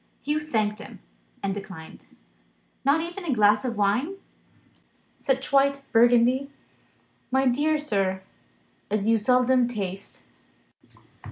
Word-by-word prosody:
Hugh 300 +2 0
thanked 220 -8 -1
him, - - -11 0.4
and 195 -1 -1
declined. 190 -5 -10 0.8
"Not 280 +4 +3
even 345 +3 -6
a 310 -6 -1
glass 210 -1 +4
of 240 -4 -3
wine? 240 - +1 1.0
Such 270 -1 -1
white 275 0 +3
Burgundy, 245 +3 +4 0.8
my 265 +1 +2
dear 295 +5 +2
sir, 195 -9 -1 0.7
as 210 0 -1
you 225 0 +3
seldom 250 +2 +3
taste." 200 -4 -6
245 Hz, 110 wpm, -25 LUFS, 210-275 Hz, 1.0 s, glass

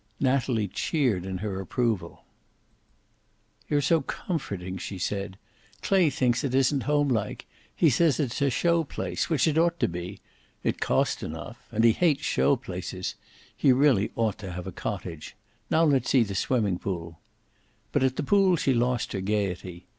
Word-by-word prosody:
Natalie 130 -5 +1
cheered 110 - 0
in 95 -1 -3
her 95 -2 -3
approval. 100 -3 -2 1.5
"You're 145 -1 +2
so 160 +3 +3
comforting," 100 - -4
she 95 - -6
said. 100 +1 -3 0.5
"Clay 190 -5 +4
thinks 125 -1 +1
it 130 -2 -1
isn't 135 0 +2
homelike. 140 -8 0 0.3
He 160 - +4
says 160 +4 +3
it's 135 -3 -1
a 140 - +3
show 170 +5 +2
place 150 - -3
which 160 -3 +2
it 160 0 +2
ought 170 0 +2
to - - +2
be. 90 +3 -6 0.4
It - - -1
cost - - +1
enough 80 +10 -7
and 115 0 +1
he 115 - +7
hates 150 +2 +1
show 140 - +3
places. 95 -6 -5 0.4
He 135 - +4
really 125 -6 +3
ought 110 -3 0
to 95 -4 -6
have 90 0 -6
a 95 - -5
cottage. 90 -5 -6 0.3
Now 160 - +3
let's 140 -6 +2
see 130 -3 +5
the 100 -3 -5
swimming 100 -2 0
pool." 85 -4 -5 0.7
But - - +1
at 130 -1 +2
the - - -2
pool 195 +3 +4
she 140 -4 +1
lost 125 0 0
her 95 - -2
gayety. 95 -3 -2
120 Hz, 165 wpm, -27 LUFS, 95-145 Hz, 1.5 s, he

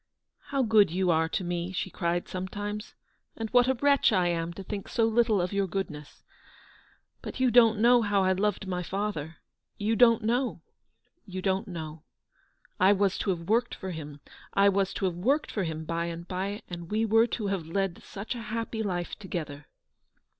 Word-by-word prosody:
" - - -56
How 275 -2 +2
good 215 -4 +5
you 180 +1 +1
are 160 0 +2
to 185 - -2
me," 175 0 -3
she 190 0 -3
cried 175 0 -1
some 185 0 -4
times, 205 +3 -5 0.2
" - - -39
and 225 -1 -4
what 245 0 +5
a 265 - +2
wretch 280 +1 +4
I 180 -4 +2
am 165 0 -1
to 195 - -8
think 200 +1 -5
so 225 - +1
little 225 -2 +3
of 180 +2 -1
your 200 -1 +1
goodness. 155 -6 -5 1.0
But - - -7
you 255 -1 +3
don't 230 -2 +6
know 240 +2 +5
how 205 -3 +2
I 185 - +3
loved 195 +1 0
my 180 -1 -2
father. 180 -4 -3 0.4
You 215 +2 0
don't 230 -1 +5
know 245 +3 0 0.3
— 345 - -46
you 185 - -2
don't 190 +3 0
know. 160 -3 -7 0.8
I 190 +2 +6
was 200 -1 +1
to - - -1
have 175 -3 0
worked 235 +3 +1
for 190 - -6
him; 150 -3 -8 0.3
I 200 0 +6
was 195 -1 +1
to 195 - -1
have 185 - 0
worked 260 - 0
for 200 -4 -1
him 160 -1 -4
by 170 +1 -1
and 170 0 -6
by, 195 +3 -3
and 170 -1 -7
we 220 +2 +1
were 225 +2 +4
to 220 -2 -3
have 185 -5 -2
led 190 +1 -2
such 200 +5 -6
a 240 - -6
happy 225 0 -3
life 180 -4 -3
together." 155 -7 -6
195 Hz, 205 wpm, -28 LUFS, 175-220 Hz, 1.0 s, don't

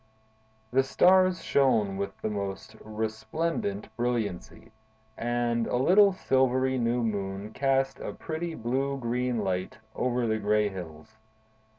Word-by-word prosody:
The 130 +2 +4
stars 185 +6 +4
shone 110 -8 +2
with 100 0 -4
the - - 0
most 100 -2 -5
resplendent 110 +1 -3
brilliancy, 110 -5 -3 0.4
and 120 0 0
a - - -1
little 195 +10 +6
silvery 130 -5 +1
new 120 +1 +1
moon 100 -1 -3
cast 135 -1 +1
a - - -5
pretty 165 +1 -5
blue 135 +4 -1
green 125 -2 -1
light 95 +1 -2 0.2
over 125 -1 0
the 110 -1 0
gray 105 0 +2
hills. 95 +3 -10
120 Hz, 120 wpm, -28 LUFS, 105-135 Hz, 0.4 s, little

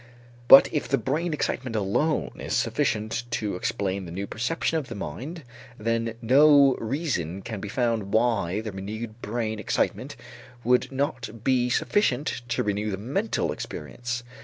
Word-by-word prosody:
But 135 - +10
if 150 - -1
the 135 +3 +2
brain 160 +7 -1
excitement 130 -5 -2
alone 110 +10 0
is - - -2
sufficient 110 +2 0
to 105 -4 -1
explain 95 +1 -2
the 85 - -8
new 95 +3 -3
perception 160 +9 -1
in - - -5
the 115 - -7
mind, 130 - -6 0.3
then 115 +1 -1
no 140 +2 +6
reason 110 - -2
can 110 -4 -5
be 105 - -5
found 115 -4 0
why 110 -4 +1
the 110 -1 -5
renewed 110 +4 -6
brain 110 -1 -2
excitement 105 - -1 0.5
would 125 +3 +2
not 130 -5 -3
be 125 -2 +2
sufficient 135 - +1
to 120 - 0
renew 105 +1 -1
the 95 - -2
mental 115 +2 -1
experience. 120 0 -5
115 Hz, 150 wpm, -26 LUFS, 105-135 Hz, 0.5 s, But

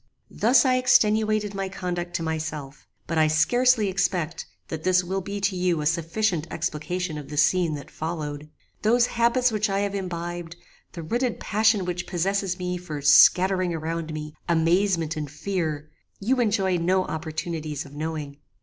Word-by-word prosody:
"Thus 245 +4 +4
I 255 -1 +3
extenuated 215 -4 +3
my 195 -1 -3
conduct 175 -2 -4
to 165 - -1
myself, 155 -3 -5 0.2
but 165 -2 -1
I 155 - +5
scarcely 240 +8 +3
expect 180 -3 -1 0.2
that 160 -1 -5
this 185 0 +3
will 190 +2 -2
be 200 +2 -5
to 195 0 0
you 180 -2 +1
a 150 - -3
sufficient 170 +2 0
explication 160 +1 -3
of 145 - -10
the 150 - -6
scene 165 +1 +3
that 145 - -9
followed. 150 -2 -5 0.3
Those 235 +3 +4
habits 240 +1 +2
which 215 0 0
I 195 0 0
have 200 0 -2
imbibed, 175 -3 -5 0.4
the 170 - -7
rooted 240 +8 -1
passion 215 -2 +2
which 175 0 -3
possesses 190 +1 -1
me 180 -1 -3
for 165 -4 -6
scattering 185 +4 +5
around 165 0 -4
me 150 0 -6 0.2
amazement 170 0 +2
and 150 -2 -4
fear, 155 -2 -3 0.3
you 250 +6 +1
enjoy 200 -5 +1
no 185 +2 +1
opportunities 160 -1 -4
of 140 - -13
knowing. 150 -2 -5
175 Hz, 160 wpm, -25 LUFS, 155-200 Hz, 0.4 s, I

